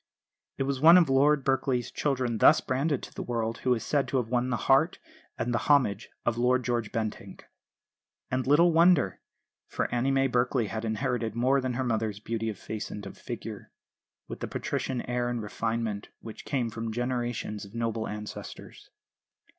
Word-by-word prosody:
It - - 0
was 135 -1 -2
one 165 +3 +9
of 165 -6 +4
Lord 140 +1 +4
Berkeley's 130 -2 0
children 125 -6 -1
thus - - +7
branded 140 +2 -1
to - - -9
the - - -6
world 115 -1 -2
who 125 -1 +2
is 115 - -5
said 145 -2 +1
to 135 - 0
have 120 -3 -1
won 125 +1 0
the 120 - 0
heart 140 +6 +4 0.4
and 120 - -1
the 115 - +1
homage 120 -8 +3 0.2
of 120 0 0
Lord 125 +1 +2
George 120 -4 -1
Bentinck. 110 -2 -4 0.9
And 130 0 -1
little 165 +5 +5
wonder; 165 - +4 0.5
for - - -2
Annie 125 +2 +1
May 135 0 +3
Berkeley 125 -1 +1
had 110 0 -4
inherited 110 0 -1
more 130 +3 +2
than 130 -1 -2
her 130 - -1
mother's 110 -4 -1
beauty 115 +1 -3
of 105 - -5
face 110 +2 -6
and 105 -1 -7
of 100 - -8
figure, - - -7 0.6
with - - -7
the - - -4
patrician 130 -2 -3
air 120 0 -1
and 120 -1 -2
refinement 110 -1 -3
which 110 -1 -10
came 125 -5 -1
from 115 +1 -4
generations 120 -3 -3
of 100 +2 -12
noble 115 -1 -2
ancestors. 105 0 -8
120 Hz, 180 wpm, -28 LUFS, 115-135 Hz, 0.9 s, one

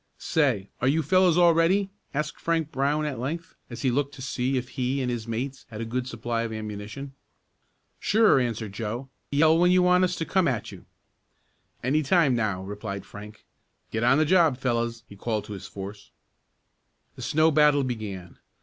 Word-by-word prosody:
"Say, 130 - 0
are 125 - +2
you 155 +4 +2
fellows 180 +2 +4
all 175 -1 +6
ready?" 190 +4 +2 0.2
asked 150 +1 -3
Frank 165 -2 -1
Brown 145 +3 0
at 140 -5 -3
length, 165 +7 -4 0.2
as 120 -2 -7
he 130 - +3
looked 140 +2 -1
to 130 - -10
see 130 0 -1
if 125 0 -3
he 130 0 -1
and 125 -2 -1
his 120 -2 -4
mates 130 +4 -4
had 110 -2 -8
a 115 - -3
good 125 +2 -3
supply 115 -1 -3
of 115 -1 -3
ammunition. 110 +5 -6 0.9
"Sure," 215 -8 +4
answered 115 -4 -2
Joe. 115 +5 -4 0.2
"Yell 160 +3 +4
when 180 +1 +5
you 180 0 +5
want 180 0 +4
us 180 -1 +1
to 165 - -3
come 185 0 +2
at 120 -5 -2
you." - - -12 1.0
"Any 140 +5 +2
time 150 -3 +3
now," 105 -5 -1
replied 100 0 -6
Frank. 105 +1 -11 0.5
"Get 110 +1 -1
on 125 +3 +5
the 155 - +3
job, 165 -5 +4
fellows!" 120 -2 -1
he 100 - -13
called 110 +1 -2
to 105 - -7
his 95 - -8
force. 100 +1 -9 1.1
The - - -10
snow 155 +1 +3
battle 150 -1 +4
began. 105 -8 -5
130 Hz, 185 wpm, -26 LUFS, 110-155 Hz, 1.1 s, all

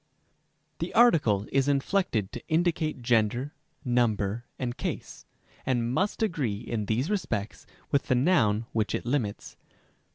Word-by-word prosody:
The - - -4
article 145 - +4
is 135 0 +2
inflected 140 - +1
to 120 - -6
indicate 160 -4 0
gender, 120 +4 +1 0.3
number, 120 -2 +1
and 125 -2 -3
case, - - -5 0.4
and 120 -2 0
must 200 +7 0
agree 145 - -1
in 105 -3 -3
these 125 - 0
respects 110 - -3 0.2
with 140 - +1
the 130 - +3
noun 120 - +3
which 110 -1 0
it - - -4
limits. 120 -5 -2
125 Hz, 130 wpm, -28 LUFS, 110-150 Hz, 0.4 s, article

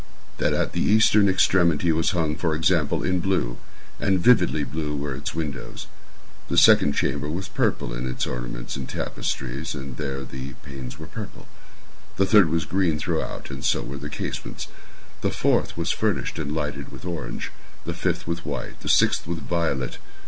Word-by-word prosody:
That - - +2
at - - 0
the - - -1
eastern 105 -1 +5
extremity 85 -3 +3
was 80 0 +2
hung, 80 -4 0
for 80 -1 0
example, 80 -2 +2
in 90 0 +1
blue—and 95 +2 -1
vividly 90 -7 +4
blue 75 0 -3
were 70 -1 -2
its 70 +4 -5
windows. 75 -4 -4 0.6
The - - 0
second 70 - +7
chamber 70 +2 0
was 90 +4 -3
purple 80 -9 0
in - - -3
its 65 - -1
ornaments - - -4
and 65 -1 -5
tapestries, 70 +6 -3
and 65 -2 -6
here 70 -1 -3
the 65 0 -7
panes 65 -2 -7
were 80 - -8
purple. 105 +3 -8 0.7
The 95 - +4
third 95 -5 +6
was 80 -1 0
green 90 -4 +1
throughout, 80 -2 -3
and 65 0 -6
so - - +2
were 70 +3 -6
the 75 +2 -5
casements. - - -5 0.5
The - - +2
fourth - - +1
was 85 +1 0
furnished 105 -5 -1
and 75 -2 -2
lighted 75 -2 -3
with - - -10
orange—the 85 -3 -6
fifth - - -1
with 85 +1 -3
white—the - - -5
sixth - - +4
with 85 -2 -3
violet. 80 -7 -1
80 Hz, 165 wpm, -25 LUFS, 70-90 Hz, 0.7 s, second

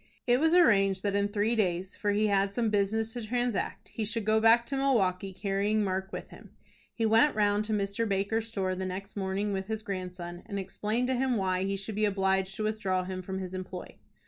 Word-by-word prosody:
It 245 0 +4
was 320 +3 +4
arranged 195 - +4
that 200 -1 0
in 200 0 +2
three 210 +3 0
days, 185 -3 -1
for 205 - 0
he 210 +1 +2
had 200 -1 +1
some 230 -3 +1
business 215 +2 0
to 240 - -5
transact, 240 -1 -2
he 225 - -4
should 220 0 -2
go 220 0 +3
back 230 +1 +5
to 275 - -4
Milwaukie 195 -9 +1
carrying 200 +2 0
Mark 190 0 -2
with - - -6
him. - - -13 0.4
He 225 - -1
went 225 +7 +4
round 205 0 +2
to 220 - -4
Mr. 205 +2 -1
Baker's 205 +3 0
store 195 -4 -1
the 185 +1 -4
next 195 +2 -6
morning 200 +1 -1
with 190 0 -3
his 220 0 -3
grandson 180 -3 -5
and 200 -3 -4
explained 210 +5 -2
to - - +2
him 255 -1 +1
why 185 -1 0
he 195 0 -1
should 200 +3 -5
be 215 +1 +1
obliged 190 -1 +1
to 215 - -3
withdraw 205 -4 0
him 185 0 -5
from 190 +1 -5
his 185 -1 -5
employ. 185 -1 -6
205 Hz, 220 wpm, -29 LUFS, 190-220 Hz, 0.4 s, back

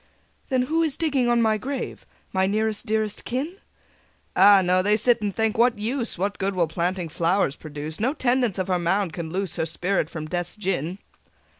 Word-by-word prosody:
'" - - -39
"Then 260 -2 +2
who 320 +6 +1
is 315 -4 0
digging 280 -7 +1
on 240 -1 +3
my 215 -1 +2
grave, 270 +4 -5 0.3
My 190 0 +2
nearest 215 +2 0
dearest 215 -1 -1
kin?" 290 +10 -3 0.8
"Ah, 195 +1 +7
no: 180 +1 +3
they 205 +3 +3
sit 235 0 +3
and 205 -2 -2
think, 225 0 0
'What 240 -1 +4
use! 235 +2 -2
What 195 +2 -2
good 195 0 -1
will 175 -2 +3
planting 175 +2 -2
flowers 165 0 +1
produce? 155 0 -7
No 255 +7 0
tendance 245 - +1
of 185 -1 -1
her 180 -1 +1
mound 175 +1 0
can 165 -2 -5
loose 190 +1 -3
Her - - 0
spirit 175 0 0
from 155 -2 -6
Death's 175 +1 -3
gin.'" 185 -4 -2
200 Hz, 195 wpm, -24 LUFS, 175-235 Hz, 0.8 s, Ah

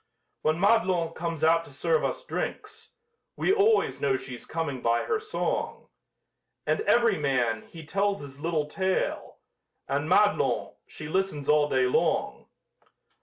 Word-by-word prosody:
When 155 +2 +1
Madelon 190 -5 +2
comes 165 -2 -4
out 165 +1 +4
to - - -14
serve 480 0 0
us - - -2
drinks, - - -5 0.4
We 385 - +2
always 430 +1 +2
know 135 -2 +2
she's 130 -2 -9
coming 155 -6 -3
by 115 0 +1
her 440 - 0
song! 430 0 -3 0.8
And - - +1
every 230 -6 +4
man, 125 -6 +1
he 165 -2 -11
tells 200 +4 0
his 140 -1 -10
little 160 -1 -1
tale, 190 +5 -2 0.5
And - - -1
Madelon, - - +2
she 155 - -8
listens 170 -4 -1
all 150 -1 +4
day 130 -2 +2
long. 125 - 0
165 Hz, 140 wpm, -27 LUFS, 145-195 Hz, 0.8 s, out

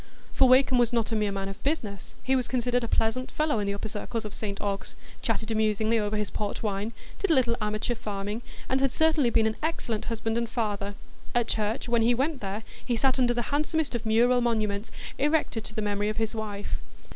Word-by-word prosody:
For 265 -2 +5
Wakem 255 -1 +5
was 240 -2 +4
not 230 -2 +1
a - - +1
mere 210 -2 +1
man 195 0 -3
of 195 +1 -7
business; 215 - -2
he 265 - +2
was 255 -2 +1
considered 245 -1 +1
a - - -1
pleasant 225 +4 0
fellow 305 -6 +1
in 205 - -1
the 200 - 0
upper 200 - -4
circles 220 +2 -4
of 210 - -6
St 200 -2 -4
Ogg's—chatted 205 +2 -3
amusingly 220 +1 +2
over 210 0 -1
his 210 -1 -2
port 210 +1 -3
wine, 205 +1 -1 0.3
did 400 - 0
a 320 - +6
little 240 -3 +3
amateur 215 +3 0
farming, 210 -1 -4 0.3
and 265 +1 +1
had 270 -1 +3
certainly 315 -5 +3
been 225 -1 +3
an 220 0 0
excellent 275 -9 -2
husband 225 0 -1
and 235 -1 -2
father; 205 -4 -2 0.4
at 240 -1 +3
church, 215 +2 0
when 235 -1 +3
he 235 +2 +4
went 275 +3 0
there, 200 +2 -3 0.2
he 245 - 0
sat 260 +3 +2
under 240 -1 +3
the 240 +1 -2
handsomest 305 0 +1
of 235 -1 -2
mural 240 +3 +4
monuments 215 -3 0 0.3
erected 295 -6 +1
to 215 - -6
the 215 - -1
memory 205 0 0
of 215 - -3
his 225 0 0
wife. 210 -2 -4
225 Hz, 215 wpm, -28 LUFS, 210-250 Hz, 0.4 s, a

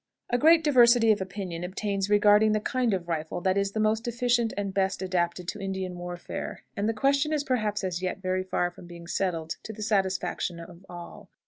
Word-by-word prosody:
A 245 - +3
great 325 +3 +6
diversity 240 -5 +6
of 205 - +1
opinion 190 -3 -5
obtains 195 +1 -2
regarding 210 +1 +5
the 215 - +2
kind 245 +2 0
of 185 -3 -2
rifle 160 +1 -3
that 185 +1 +1
is 200 0 0
the 220 - -2
most 215 +2 +1
efficient 240 -1 +1
and 200 -1 -2
best 190 0 0
adapted 175 -1 -1
to - - -5
Indian 190 -2 -3
warfare, 175 0 -6
and 205 +2 0
the - - +1
question 280 +6 +2
is 300 -2 0
perhaps 215 -7 -1
as 180 -2 -2
yet 185 -1 -2
very 185 -1 -1
far 175 -1 -1
from 175 - -13
being 170 -1 -11
settled 170 -2 -2
to - - -7
the 215 0 -7
satisfaction 190 -4 -1
of 170 +2 -12
all. 175 -1 -10
195 Hz, 205 wpm, -27 LUFS, 180-220 Hz, -, great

